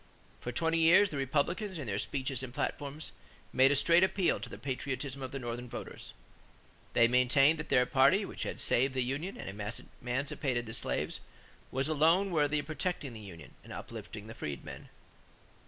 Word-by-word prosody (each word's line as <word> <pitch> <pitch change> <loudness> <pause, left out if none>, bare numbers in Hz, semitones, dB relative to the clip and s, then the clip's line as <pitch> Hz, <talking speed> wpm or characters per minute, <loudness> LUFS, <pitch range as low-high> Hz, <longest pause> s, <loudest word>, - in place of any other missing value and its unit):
For 120 - -4
twenty 165 +6 +1
years, 185 +5 +6
the 145 - -3
Republicans, 155 - -1
in 145 - -5
their 100 -3 -2
speeches 135 0 -2
and 130 -2 -6
platforms, 145 +2 -4 0.4
made 135 +1 +6
"a - - +3
straight 170 +5 +5
appeal 190 -1 +2
to - - -7
the - - -8
patriotism 135 0 -4
of 130 - -4
the 135 - -4
Northern 120 -1 -5
voters." - - -8 0.8
They 115 - +6
maintained 130 +5 +4
that 150 - -5
their 125 - +4
party, 140 +11 +4
which - - -8
had - - -3
saved 130 +2 +2
the 130 - +2
union 145 +10 -3
and - - -7
emancipated 120 +5 -3
the 110 - -7
slaves, - - -2 0.5
was 135 +2 -1
alone 165 +6 +3
worthy 150 -2 +2
of 145 - -2
protecting 155 -3 -3
the 110 - -8
union 85 -7 -11
and - - -12
uplifting 105 - -8
the 110 - -8
freedmen. 70 -9 -7
135 Hz, 175 wpm, -32 LUFS, 125-155 Hz, 0.8 s, years